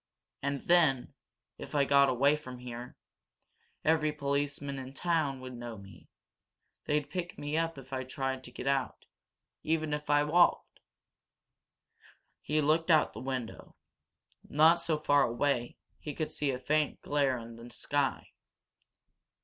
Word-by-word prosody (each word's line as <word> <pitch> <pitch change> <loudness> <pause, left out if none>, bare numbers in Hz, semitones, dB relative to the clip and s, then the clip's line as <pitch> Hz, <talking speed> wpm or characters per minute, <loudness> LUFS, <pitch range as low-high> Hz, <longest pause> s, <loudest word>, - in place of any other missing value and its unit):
And, 140 0 -3
then 160 -8 +3 0.5
if - - -8
I 140 -1 +4
got 140 0 +5
away 140 +4 +3
from 130 -4 -9
here, 125 0 -8 0.9
every 155 -1 +3
policeman 140 -1 -2
in 130 -1 -7
this 135 - -12
town 155 -6 0
would 130 0 -8
know 120 -2 -7
me. 100 0 -14 0.8
They'd 150 -1 0
pick 175 -1 -4
me 145 +1 -3
up 165 -1 0
if 135 0 -11
I 130 0 -2
tried 130 0 -3
to 125 - -9
get 125 - -7
out, 135 -1 -1 0.6
even 155 -1 0
if 150 0 -4
I 145 0 +4
walked." 170 +4 +2 1.6
He 155 +1 0
looked 160 +3 +2
out 155 -2 +5
of - - -23
the - - -8
window. 130 -3 -5 0.7
Not 160 +3 +5
so 165 -2 0
far 145 -1 +3
away 120 0 0 0.2
he 150 -2 -6
could 155 - -3
see 145 - -1
a 130 - -1
faint 150 +4 0
glare 140 -3 +1
in 115 0 -9
the 115 +1 -11
sky. 140 +2 -2
140 Hz, 150 wpm, -31 LUFS, 130-155 Hz, 1.6 s, got